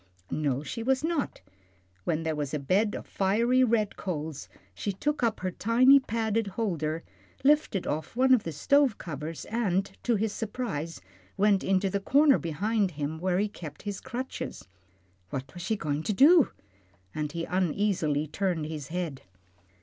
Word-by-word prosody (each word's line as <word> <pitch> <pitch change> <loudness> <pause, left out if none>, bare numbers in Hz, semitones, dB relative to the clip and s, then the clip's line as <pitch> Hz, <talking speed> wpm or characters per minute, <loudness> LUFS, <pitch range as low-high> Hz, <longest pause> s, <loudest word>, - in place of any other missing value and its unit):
No, 145 -2 0
she 230 - -5
was 265 +4 +1
not; 320 -3 -1 0.6
when 160 0 0
there 160 -1 -1
was 145 -1 -2
a - - -1
bed 195 +9 +1
of - - -6
fiery 230 +7 +2
red 220 -4 +1
coals, 155 -5 -4 0.2
she 205 - -3
took 295 +10 -2
up 230 -2 0
her 185 0 -1
tiny 250 +8 +5
padded 225 -3 -1
holder, 165 -7 -2 0.4
lifted 290 - +3
off 155 +8 -3
one 260 +1 +5
of 250 - +5
the 165 - -5
stove 275 - +3
covers, 155 0 -6
then, 200 -5 +1 0.2
to 240 - +1
his 215 0 0
surprise, 205 - -4 0.4
went 200 -1 +3
into 195 0 +2
the 200 +1 -1
corner 280 +7 +4
behind 200 +6 0
him, 150 +2 -3
where 180 +1 +1
he 205 +2 +2
kept 160 -7 -10
his 205 -2 -4
crutches. 260 - -5 0.6
What 135 -1 -5
was 175 - -8
she 220 +5 0
going 150 -6 -2
to 210 - -1
do? 295 - +6 0.6
and 150 -1 -3
he 165 +1 -3
uneasily 180 -4 0
turned 170 0 -1
his 150 -3 -5
head. 165 -5 -4
195 Hz, 165 wpm, -28 LUFS, 160-230 Hz, 0.6 s, do